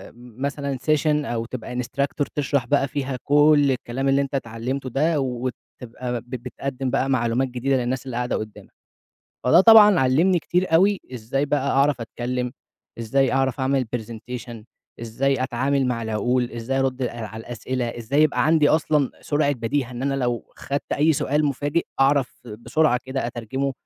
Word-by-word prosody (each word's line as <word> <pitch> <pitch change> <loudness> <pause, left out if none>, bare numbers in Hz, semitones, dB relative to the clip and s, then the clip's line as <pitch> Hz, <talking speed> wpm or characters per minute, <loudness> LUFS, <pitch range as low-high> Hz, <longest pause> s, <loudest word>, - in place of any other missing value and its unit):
مثلًا 135 +3 -4
session 150 +1 +1
أو 115 -2 -2
تبقى 125 0 -7
instructor 140 +3 -2
تشرح 140 -3 0
بقى 140 +1 +2
فيها 135 -1 -3
كُلّ 145 -1 +5
الكلام 130 +2 -2
اللي 135 +1 +3
أنت 140 0 -3
اتعلمته 130 +2 -3
ده، 155 +5 +1
وتبقى 125 -1 -5
ب 120 - -24
بتقدم 130 +1 -4
بقى 135 0 0
معلومات 125 +1 +1
جديدة 130 +2 -1
للناس 125 +1 -2
اللي 125 -2 -5
قاعدة 125 0 -1
قدامك، 110 -1 -7 0.7
فده 160 +8 +6
طبعًا 210 -3 +8
علّمني 160 +8 +3
كتير 175 +1 0
أوي 195 +4 +4
إزاي 125 +5 -2
بقى 140 -1 0
أعرف 140 -1 +2
أتكلم، 125 +2 -3 0.5
إزاي 130 +4 +1
أعرف 135 0 0
أعمل 130 -1 +1
presentation، 115 +1 -7 0.4
إزاي 130 +4 0
أتعامل 130 +2 0
مع 115 -2 -1
العقول، 120 +3 0
إزاي 120 +3 -2
أرد 130 -1 -1
ال 125 - +1
على 110 -1 -7
الأسئلة، 120 +1 -4
إزاي 135 +6 +1
يبقى 155 0 +2
عندي 155 -2 +4
أصلًا 150 -3 +2
سرعة 145 -1 +1
بَدِيهة، 125 +1 -2
إن 125 +1 -6
أنا 140 0 0
لو 120 -3 -2
خدت 140 +1 -4
أي 155 +2 +3
سؤال 150 +2 0
مفاجئ 145 +3 0 0.2
أعرف 135 -1 +3 0.3
بسرعة 125 0 +1
كده 130 -2 -3
أترجمه، 125 +4 -3
130 Hz, 160 wpm, -23 LUFS, 120-140 Hz, 0.7 s, طبعًا